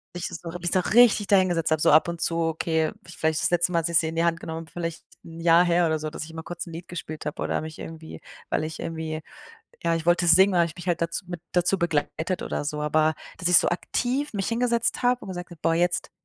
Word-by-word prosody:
Ich 175 Hz, -, -3 dB
so 170 Hz, 0 st, -7 dB
habe 175 Hz, +1 st, -6 dB
mich 175 Hz, 0 st, -2 dB
da 185 Hz, -, +3 dB
richtig 215 Hz, 0 st, +4 dB
dahin 190 Hz, -2 st, +4 dB
gesetzt 165 Hz, -2 st, 0 dB
habe 155 Hz, -1 st, +2 dB
so -, -, +4 dB
ab 155 Hz, +4 st, +6 dB
und 170 Hz, -, -5 dB
zu, 165 Hz, 0 st, -1 dB
okay 160 Hz, 0 st, 0 dB
vielleicht 160 Hz, -2 st, -1 dB
das -, -, +2 dB
letzte 175 Hz, +1 st, +2 dB
Mal, 170 Hz, -, +2 dB
dass 165 Hz, -, -2 dB
ich 170 Hz, -, +3 dB
sie 160 Hz, -, -1 dB
in 165 Hz, -, -7 dB
die 165 Hz, -, +2 dB
Hand 165 Hz, -1 st, +1 dB
genommen 160 Hz, 0 st, -6 dB
habe, -, -, -20 dB
vielleicht 170 Hz, -1 st, -5 dB, 0.2 s
'n 165 Hz, 0 st, -11 dB
Jahr 170 Hz, +1 st, +6 dB
her 175 Hz, 0 st, +3 dB
oder 160 Hz, -1 st, 0 dB
so, 155 Hz, 0 st, -4 dB
dass 155 Hz, -, -6 dB
ich 160 Hz, -, -12 dB
mal 160 Hz, -, -6 dB
kurz 175 Hz, 0 st, -6 dB
'n 165 Hz, -, -9 dB
Lied 170 Hz, +2 st, -8 dB
gespielt 155 Hz, -3 st, -7 dB
habe 150 Hz, -, -4 dB
oder -, -, -1 dB
mich 155 Hz, 0 st, -8 dB
irgendwie 160 Hz, 0 st, -9 dB, 0.3 s
weil -, -, 0 dB
ich 160 Hz, 0 st, -7 dB
irgendwie 160 Hz, -1 st, -4 dB, 0.6 s
ja, 170 Hz, 0 st, +1 dB
ich 165 Hz, 0 st, -3 dB
wollte 175 Hz, 0 st, +3 dB
singen, 190 Hz, +4 st, +6 dB
und -, -, -3 dB
dann 175 Hz, -, +4 dB
habe 170 Hz, -, +4 dB
ich -, -, -15 dB
mich 175 Hz, 0 st, -7 dB
halt 170 Hz, -1 st, 0 dB
dazu 170 Hz, +3 st, -2 dB
mit 175 Hz, -2 st, -6 dB
dazu 180 Hz, +2 st, +2 dB
begleitet 165 Hz, +1 st, -1 dB
oder -, -, -3 dB
so, 150 Hz, +1 st, -3 dB
aber 155 Hz, +1 st, +2 dB, 0.2 s
dass 175 Hz, +1 st, -1 dB
ich 180 Hz, -, +8 dB
so -, -, +1 dB
aktiv 250 Hz, +10 st, -1 dB
mich 195 Hz, -3 st, -2 dB
hingesetzt 235 Hz, 0 st, 0 dB
habe 245 Hz, 0 st, +2 dB
und -, -, -10 dB
gesagt 180 Hz, -1 st, -6 dB
habe: 170 Hz, -, -12 dB
„Boah, 165 Hz, -, +2 dB
jetzt 175 Hz, 0 st, 0 dB
170 Hz, 275 wpm, -25 LUFS, 160-180 Hz, 0.6 s, ich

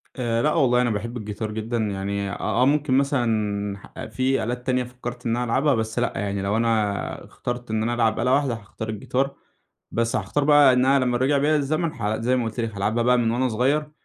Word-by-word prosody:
آآ 115 Hz, -3 st, 0 dB
لأ، 150 Hz, +3 st, +2 dB
والله 125 Hz, -2 st, +3 dB
أنا 125 Hz, -, +1 dB
باحِب 115 Hz, +3 st, -3 dB
الجيتار 105 Hz, 0 st, -5 dB
جدًا 110 Hz, +2 st, -3 dB
يعني، 100 Hz, -2 st, -2 dB
آآ، -, -, -4 dB
آه، 125 Hz, +2 st, +1 dB
ممكن 145 Hz, -1 st, +2 dB
مثلًا 110 Hz, -8 st, -1 dB
في 130 Hz, +4 st, 0 dB
آلات 125 Hz, +2 st, -4 dB
تانية 125 Hz, -1 st, +2 dB
فكَّرت 125 Hz, 0 st, -8 dB
إن 115 Hz, 0 st, +1 dB
أنا 125 Hz, -, 0 dB
ألعبها، 135 Hz, +4 st, +2 dB
بس 110 Hz, +1 st, -2 dB
لأ 120 Hz, -, 0 dB
يعني، 100 Hz, 0 st, -2 dB
لو 100 Hz, +3 st, 0 dB
أنا 110 Hz, -3 st, -1 dB
اخترت 120 Hz, -1 st, -6 dB
إن 110 Hz, 0 st, 0 dB
أنا 120 Hz, +2 st, 0 dB
ألعب 115 Hz, -2 st, +1 dB
آلة 125 Hz, +2 st, +2 dB
واحدة 140 Hz, -3 st, +2 dB
هاختار 110 Hz, 0 st, -7 dB
الجيتار. 130 Hz, +6 st, -2 dB, 0.6 s
بس 115 Hz, +1 st, 0 dB
هاختار 125 Hz, +6 st, 0 dB
بقى 145 Hz, -2 st, +6 dB
إن 125 Hz, 0 st, +3 dB
أنا 135 Hz, -1 st, +3 dB
لمّا 125 Hz, -1 st, +1 dB
رجَع 135 Hz, +3 st, +2 dB
بيّا 150 Hz, +2 st, +2 dB
الزمن، 155 Hz, +3 st, 0 dB
iJ 110 Hz, 0 st, -2 dB
زي 125 Hz, +3 st, +2 dB
ما 125 Hz, -, 0 dB
قُلت 115 Hz, +2 st, -5 dB
لك، 115 Hz, -2 st, -2 dB
هالعبها 110 Hz, +4 st, 0 dB
بقى 125 Hz, +1 st, +4 dB
من 115 Hz, -2 st, +1 dB
وأنا 125 Hz, +2 st, +1 dB
صغيِّر، 140 Hz, +7 st, 0 dB
120 Hz, 220 wpm, -24 LUFS, 110-130 Hz, 0.6 s, بقى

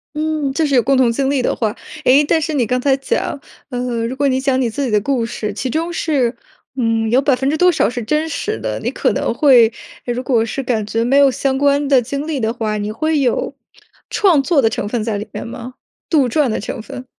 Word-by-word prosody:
嗯， 305 Hz, -3 st, -1 dB
就 320 Hz, -, 0 dB
是 280 Hz, -2 st, +1 dB
有 245 Hz, -, +4 dB
共 275 Hz, +3 st, +2 dB
同 250 Hz, -3 st, +3 dB
经 270 Hz, +3 st, 0 dB
历 275 Hz, -2 st, +1 dB
的 -, -, 0 dB
话。 215 Hz, -3 st, -1 dB, 0.3 s
诶， 275 Hz, +4 st, +6 dB
但 320 Hz, +3 st, +2 dB
是 315 Hz, 0 st, -3 dB
你 250 Hz, -7 st, +1 dB
刚 250 Hz, +1 st, 0 dB
才 270 Hz, +1 st, +2 dB
讲， 275 Hz, +1 st, -2 dB, 0.3 s
呃， 245 Hz, -2 st, -2 dB
如 250 Hz, -, -4 dB
果 280 Hz, +1 st, +1 dB
你 260 Hz, -1 st, +1 dB
讲 265 Hz, -1 st, +1 dB
你 240 Hz, -, 0 dB
自 280 Hz, +5 st, -3 dB
己 240 Hz, -, -2 dB
的 210 Hz, -, +3 dB
故 250 Hz, 0 st, 0 dB
事， 215 Hz, -2 st, -4 dB
其 250 Hz, +4 st, -3 dB
中 330 Hz, +2 st, -1 dB
是， 275 Hz, -8 st, 0 dB, 0.4 s
嗯， 225 Hz, -3 st, 0 dB
有 250 Hz, +3 st, +4 dB
百 275 Hz, -2 st, +2 dB
分 270 Hz, +2 st, -1 dB
之 310 Hz, -, 0 dB
多 360 Hz, +1 st, +5 dB
少 -, -, +1 dB
是 245 Hz, 0 st, -5 dB
真 305 Hz, +8 st, -1 dB
实 425 Hz, +8 st, -3 dB
的， -, -, -3 dB
你 -, -, -2 dB
可 -, -, 0 dB
能 -, -, -1 dB
会 245 Hz, -7 st, +5 dB, 0.3 s
如 245 Hz, 0 st, -2 dB
果 235 Hz, -4 st, +1 dB
是 270 Hz, +4 st, -4 dB
感 230 Hz, -5 st, -1 dB
觉 225 Hz, +2 st, -1 dB
没 265 Hz, +4 st, +2 dB
有 280 Hz, -2 st, +6 dB
相 265 Hz, +1 st, -1 dB
关 285 Hz, 0 st, +2 dB
的 270 Hz, -2 st, +5 dB
经 280 Hz, +5 st, -4 dB
历 305 Hz, -4 st, -2 dB
的 225 Hz, -1 st, -1 dB
话， 220 Hz, -3 st, -2 dB
你 210 Hz, +1 st, -3 dB
会 310 Hz, +6 st, 0 dB
有 250 Hz, -4 st, 0 dB, 0.6 s
创 340 Hz, -9 st, +3 dB
作 290 Hz, -2 st, +3 dB
的 225 Hz, -, +3 dB
成 205 Hz, -, -3 dB
分 225 Hz, 0 st, -2 dB
在 215 Hz, -2 st, -2 dB
里 210 Hz, -, -6 dB
面 -, -, -6 dB
吗？ 240 Hz, +2 st, -8 dB, 0.4 s
杜 275 Hz, -6 st, +3 dB
撰 295 Hz, +1 st, +2 dB
的 220 Hz, -, -2 dB
成 -, -, -5 dB
分？ 250 Hz, +3 st, -8 dB
260 Hz, 270 characters per minute, -18 LUFS, 230-285 Hz, 0.6 s, 诶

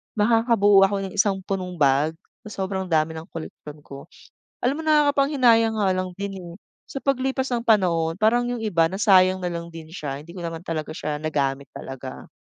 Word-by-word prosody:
makakabuo 210 Hz, -3 st, +4 dB
ako 200 Hz, -, -3 dB
ng -, -, -13 dB
isang 200 Hz, -2 st, +3 dB
punong 185 Hz, -2 st, -4 dB
bag, 145 Hz, +1 st, +2 dB, 0.3 s
sa 200 Hz, -2 st, -4 dB
sobrang 190 Hz, -1 st, -3 dB
dami 160 Hz, -1 st, +1 dB
ng 160 Hz, +3 st, -9 dB
koleksyon 155 Hz, -2 st, -9 dB
ko. 140 Hz, +3 st, -11 dB, 0.6 s
Alam 280 Hz, +5 st, 0 dB
mo -, -, -5 dB
nakakapanghinayang 275 Hz, -7 st, +3 dB
nga 200 Hz, -3 st, +1 dB
lang 185 Hz, 0 st, -2 dB
din, 200 Hz, 0 st, -4 dB
eh, 170 Hz, -1 st, -10 dB, 0.3 s
sa 275 Hz, -, -5 dB
paglipas 265 Hz, -1 st, 0 dB
ng 235 Hz, -, 0 dB
panahon 170 Hz, -6 st, +2 dB
parang 235 Hz, +4 st, +2 dB
yung 240 Hz, -2 st, -3 dB
iba 175 Hz, -7 st, +2 dB
nasayang 185 Hz, -1 st, +4 dB
nalang 170 Hz, -2 st, -4 dB
din 160 Hz, -1 st, -10 dB
siya 145 Hz, -5 st, -6 dB
hindi 170 Hz, +4 st, -13 dB
ko 175 Hz, -, -6 dB
naman 165 Hz, -1 st, -5 dB
talaga 155 Hz, -2 st, -3 dB
siya 150 Hz, -1 st, -4 dB
nagamit 140 Hz, -3 st, -2 dB
talaga 135 Hz, 0 st, -8 dB
185 Hz, 180 wpm, -23 LUFS, 160-225 Hz, 0.6 s, makakabuo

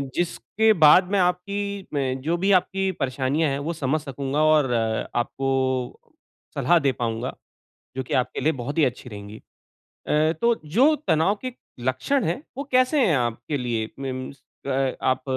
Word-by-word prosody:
जिसके 175 Hz, -, +1 dB
बाद 180 Hz, +3 st, +6 dB
मैं 200 Hz, -, +2 dB
आपकी 200 Hz, +2 st, -1 dB
मैं 135 Hz, -2 st, -1 dB
जो 165 Hz, +5 st, 0 dB
भी 195 Hz, +3 st, +1 dB
आपकी 190 Hz, +1 st, -2 dB
परेशानियाँ 135 Hz, +4 st, 0 dB
है 140 Hz, -, -2 dB
वो 165 Hz, +4 st, -3 dB
समझ 150 Hz, 0 st, -1 dB
सकूँगा 140 Hz, +1 st, -2 dB
और 150 Hz, -5 st, +3 dB
आपको 120 Hz, +4 st, -1 dB, 1.0 s
सलाह 175 Hz, 0 st, +3 dB
दे 140 Hz, -2 st, +2 dB
पाऊँगा। 115 Hz, 0 st, -3 dB, 0.6 s
जो 130 Hz, -, -1 dB
कि -, -, -4 dB
आपके 125 Hz, -, 0 dB
लिए 160 Hz, -, +2 dB
बहुत 140 Hz, +4 st, -5 dB
ही 155 Hz, -, +5 dB
अच्छी 125 Hz, 0 st, -3 dB
रहेंगी। 105 Hz, -1 st, -9 dB, 0.7 s
अ, 155 Hz, +1 st, +2 dB
तो 235 Hz, 0 st, +3 dB
जो 245 Hz, -, +4 dB
तनाव 160 Hz, +6 st, +3 dB
के 255 Hz, -, -3 dB, 0.3 s
लक्षण 130 Hz, -, 0 dB
है, 175 Hz, -, -2 dB
वो 280 Hz, -, -3 dB
कैसे 255 Hz, +4 st, +3 dB
हैं 160 Hz, -, +3 dB
आपके 120 Hz, +3 st, -2 dB
लिए 115 Hz, -3 st, -2 dB
मीन्स 130 Hz, 0 st, -6 dB, 0.2 s
अ, 135 Hz, -1 st, 0 dB
आप 130 Hz, 0 st, +1 dB
145 Hz, 160 wpm, -24 LUFS, 130-180 Hz, 1.0 s, बाद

